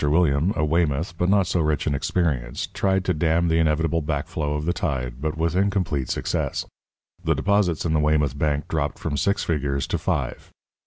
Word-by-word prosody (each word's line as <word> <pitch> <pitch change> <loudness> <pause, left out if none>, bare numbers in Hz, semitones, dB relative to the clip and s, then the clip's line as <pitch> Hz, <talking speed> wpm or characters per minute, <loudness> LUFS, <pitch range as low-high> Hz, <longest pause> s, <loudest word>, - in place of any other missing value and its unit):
William, 75 +2 +3
a 75 - +1
Weymouth, 80 +1 0
but 90 +2 0
not 100 -1 +4
so 90 0 0
rich 75 -3 0
in - - +1
experience, 70 -5 -1
tried 95 -1 0
to 90 - +2
dam 85 +2 +2
the 80 0 +3
inevitable 80 +1 +1
backflow 75 0 -2
of 75 - -4
the 85 - +1
tide, 65 -7 -3
but 80 +1 -2
with 80 +1 0
incomplete 90 -8 0
success. - - -1 0.6
The - - +2
deposits 100 -5 +1
in 80 - +1
the 80 - +3
Weymouth 75 -2 +2
Bank 75 0 0
dropped 75 -2 -1
from 75 - -3
six 100 +7 +1
figures 70 -4 -1
to - - -2
five. - - -2
80 Hz, 190 wpm, -24 LUFS, 75-85 Hz, 0.6 s, not